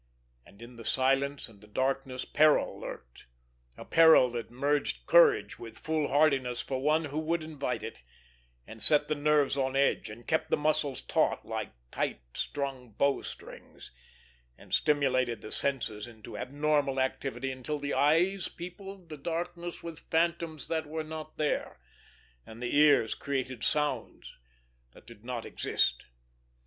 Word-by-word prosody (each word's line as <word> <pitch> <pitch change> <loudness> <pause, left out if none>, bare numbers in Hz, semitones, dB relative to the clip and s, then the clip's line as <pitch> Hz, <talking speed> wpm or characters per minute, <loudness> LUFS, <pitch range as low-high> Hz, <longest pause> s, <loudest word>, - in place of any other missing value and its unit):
And 105 +4 -15
in 120 0 -12
the 115 - -9
silence 135 +3 +1
and 105 -3 -18
the 105 - -16
darkness 130 +3 -2
peril 155 0 +3
lurked—a - - -12
peril 160 -6 +6
that 120 -1 -5
merged 140 +4 -1
courage 460 -4 +5
into 115 -1 -9
foolhardiness 145 -5 +1
for 130 -1 -3
one 155 +3 +2
who 145 +1 -3
would 160 +1 -1
invite 140 -7 -3
it, 110 - -7 0.6
and 110 0 -11
set 150 -1 +4
the - - +2
nerves 145 -1 +2
on 130 0 0
edge, 140 -4 +2
and 115 +3 -11
kept 160 0 0
the - - +2
muscles 150 -2 0
taut - - +1
like - - -4 0.2
tight - - -2
strung 135 -5 -4
bow 140 +6 +2
strings, - - -11 0.7
and - - -13
stimulated 130 -5 +2
the 110 - -8
senses 120 -6 +1
into 110 -3 -11
abnormal 140 +4 0
activity 130 0 -2
until 130 +4 -4
the 145 0 -3
eyes 175 +6 +3
peopled 185 +1 -9
the 155 - -7
darkness 170 +3 -4
with 165 -2 -9
phantoms 165 -2 0
that 160 -2 -2
were 160 +1 -3
not 155 0 -8
there, 150 - -1 0.6
and 110 - -12
the 120 +2 -2
ears 145 -6 +5
created 130 -4 -3
sounds 150 -1 -2 0.6
that - - -17
did 115 -3 -14
not 120 -2 -4
exist. - - 0
140 Hz, 145 wpm, -30 LUFS, 125-155 Hz, 0.7 s, peril